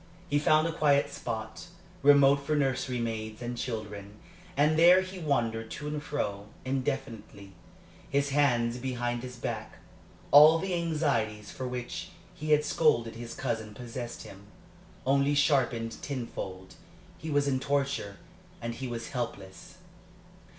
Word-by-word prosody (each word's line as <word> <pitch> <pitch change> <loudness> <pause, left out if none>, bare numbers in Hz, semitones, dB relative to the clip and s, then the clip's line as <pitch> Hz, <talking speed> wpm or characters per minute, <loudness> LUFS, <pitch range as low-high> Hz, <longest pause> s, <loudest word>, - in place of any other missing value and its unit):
He 145 - +3
found 155 +1 +4
a - - -1
quiet 145 -3 +3
spot, 110 +8 -5 0.3
remote 140 -1 +6
from 140 +2 -1
nursery 130 -2 0
maids 110 -2 -4
and 120 0 -4
children, 105 -4 -5 0.4
and 150 +2 +4
there 175 +3 +7
he 185 0 -7
wandered 115 -8 -1
to 150 - -6
and 150 0 -3
fro, 105 -9 -3 0.2
indefinitely, 120 -7 -4 0.6
his 140 +1 +1
hands 125 -4 +2
behind 120 -1 -2
his 125 0 -7
back. 115 -3 -5 0.6
All 150 +3 +9
the 190 +2 -2
anxieties 115 -11 -1
for 130 - -5
which 125 -1 -5 0.2
he 155 +1 -6
had 150 0 +4
scolded 145 -7 +2
his 115 0 -7
cousin 110 -4 -3
possessed 120 0 -6
him, 100 +1 -13 0.6
only 140 +2 +3
sharpened 125 -6 +1
tenfold; 95 -8 -6 0.5
he 160 - -6
was 145 -1 +2
in 130 -2 +1
torture, 140 -7 -1 0.4
and 115 0 -4
he 130 +2 -5
was 115 -1 -5
helpless. 100 -7 -6
125 Hz, 135 wpm, -29 LUFS, 115-145 Hz, 0.6 s, All